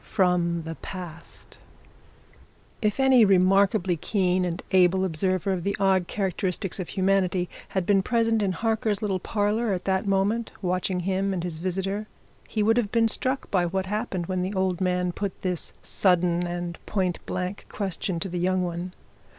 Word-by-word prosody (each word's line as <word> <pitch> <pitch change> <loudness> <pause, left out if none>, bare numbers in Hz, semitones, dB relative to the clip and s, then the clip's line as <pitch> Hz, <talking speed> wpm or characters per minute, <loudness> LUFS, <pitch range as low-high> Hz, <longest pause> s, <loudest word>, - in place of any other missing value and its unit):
FROM 175 -3 +1
THE 165 +1 -5
PAST 175 -2 -10 1.2
If 210 +2 0
any 265 -3 +6
remarkably 195 -1 +4
keen 185 +1 +1
and 175 0 -3
able 185 0 +4
observer 185 +3 0
of 180 -2 -3
the 200 +2 -1
odd 190 -2 +3
characteristics 190 -1 -2
of 180 - -4
humanity 190 -2 +1 0.2
had 190 -2 -2
been 195 0 +4
present 230 0 +1
in 195 -2 +1
Harker's 220 +1 0
little 195 -3 0
parlour 210 +3 0
at 180 - -4
that 190 +1 0
moment, 200 +4 +1
watching 185 0 -1
him 195 +2 0
and 175 - -3
his 170 -3 -4
visitor, 195 +4 -2 0.4
he 215 - 0
would 225 +2 +3
have 220 -4 +1
been 230 -1 +3
struck 260 +4 -1
by 180 -3 +2
what 190 +2 -1
happened 200 -3 -2
when 185 +1 -2
the 190 +3 -2
old 190 -1 0
man 180 -1 +1
put 195 +1 -4
this 180 -3 -2
sudden 180 -2 +2
and 175 -1 -5
point 185 -4 -1
blank 185 +2 -4
question 190 -3 -2
to 195 - -2
the 175 -1 -3
young 185 +1 +1
one. 175 +1 -4
190 Hz, 165 wpm, -26 LUFS, 180-200 Hz, 1.2 s, any